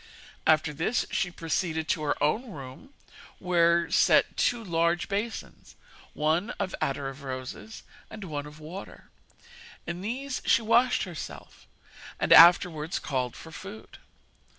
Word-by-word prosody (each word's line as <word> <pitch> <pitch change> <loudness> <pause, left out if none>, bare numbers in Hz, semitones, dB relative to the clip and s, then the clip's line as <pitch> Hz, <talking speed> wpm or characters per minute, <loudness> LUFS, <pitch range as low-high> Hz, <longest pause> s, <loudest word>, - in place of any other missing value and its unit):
After 155 -1 +3
this 165 - 0
she 180 - 0
proceeded 165 -1 -2
to 155 - 0
her 150 -1 -1
own 220 - 0
room 140 - -10 0.5
where 170 -2 +3
were 170 - -7
set - - +4
two 240 -2 0
large 170 -1 0
basins, 210 +3 -5 0.4
one 160 +8 +1
of 190 -3 -3
attar 135 0 -1
of 135 +1 -8
roses 130 +10 -7 0.3
and 220 -2 -9
one 150 -5 -5
of 150 +1 -13
water; 170 +6 -10 0.7
in 170 +1 -5
these 255 +6 -4
she 230 - +3
washed 235 +3 +3
herself, 175 -6 -9 0.5
and - - +4
afterwards 170 -1 +6
called 130 -4 -3
for 165 - -11
food. 195 +6 -11
170 Hz, 135 wpm, -27 LUFS, 150-200 Hz, 0.7 s, afterwards